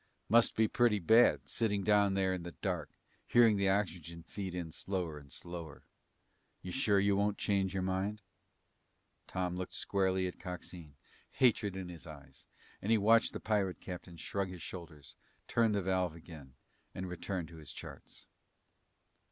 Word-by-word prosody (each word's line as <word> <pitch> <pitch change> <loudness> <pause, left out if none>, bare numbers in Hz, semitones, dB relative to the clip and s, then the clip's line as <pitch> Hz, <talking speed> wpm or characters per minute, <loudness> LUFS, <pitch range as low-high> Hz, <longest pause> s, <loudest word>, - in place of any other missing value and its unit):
"Must 115 +1 +5
be 110 0 +4
pretty 120 -1 +3
bad, 110 +6 +5
sitting 105 -4 0
down 100 -1 +4
there 95 -1 +2
in 90 - -3
the 85 0 -7
dark, - - -3 0.4
hearing 115 -3 +6
the 100 -1 +2
oxygen 85 -4 -1
feed 95 -1 -6
in 85 -3 -4
slower 85 -3 -3
and 70 -2 -16
slower. 85 0 -6 0.8
You 90 - -5
sure 105 -5 +3
you 100 0 +3
won't 100 +1 +1
change 95 -2 0
your 95 - 0
mind?" 95 +3 -2 1.0
Tom 90 -1 -2
looked 90 0 -5
squarely 95 -1 +1
at 90 - -5
Coxine, 90 -4 -8 0.4
hatred 110 -6 +3
in 95 -1 -5
his 85 -2 -10
eyes, 70 -3 -12 0.3
and 105 - -1
he 115 - +6
watched 110 +2 +4
the - - -4
pirate 100 -4 0
captain 90 -2 -8
shrug 100 +4 -2
his 90 -3 -8
shoulders, 85 -6 -9 0.3
turn 115 -2 +3
the 100 -2 0
valve 90 -3 0
again, 75 -6 -12 0.4
and 95 - -4
return 90 0 -4
to 85 +1 -13
his 75 -3 -9
charts. - - -10
95 Hz, 160 wpm, -33 LUFS, 85-100 Hz, 1.0 s, hearing